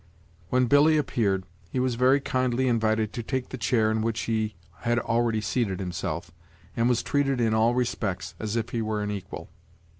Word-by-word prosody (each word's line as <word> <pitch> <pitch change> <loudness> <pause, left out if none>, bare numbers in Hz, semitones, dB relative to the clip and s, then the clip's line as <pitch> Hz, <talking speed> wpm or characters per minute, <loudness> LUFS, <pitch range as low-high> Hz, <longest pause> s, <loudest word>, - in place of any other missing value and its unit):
When 125 0 +3
Billy 145 +5 +5
appeared, 100 -10 0 0.3
he 130 - -2
was 125 -1 +1
very 130 +4 +4
kindly 130 -1 0
invited 110 -2 +1
to 120 - -3
take 130 +2 -3
the 130 - -6
chair 110 -2 +2
in 110 0 0
which 115 0 -1
he 110 -2 -1 0.2
had 120 0 0
already 115 -1 +1
seated 105 -4 -1
himself, 85 -3 -4 0.4
and 115 +1 +2
was 120 -2 +1
treated 140 -2 +1
in 115 -2 +2
all 115 +2 +3
respects 115 -6 -2
as 110 0 -3
if 115 -1 -1
he 115 - -2
were 110 -1 -1
an 105 - -2
equal. 100 -3 -7
115 Hz, 185 wpm, -26 LUFS, 110-125 Hz, 0.4 s, Billy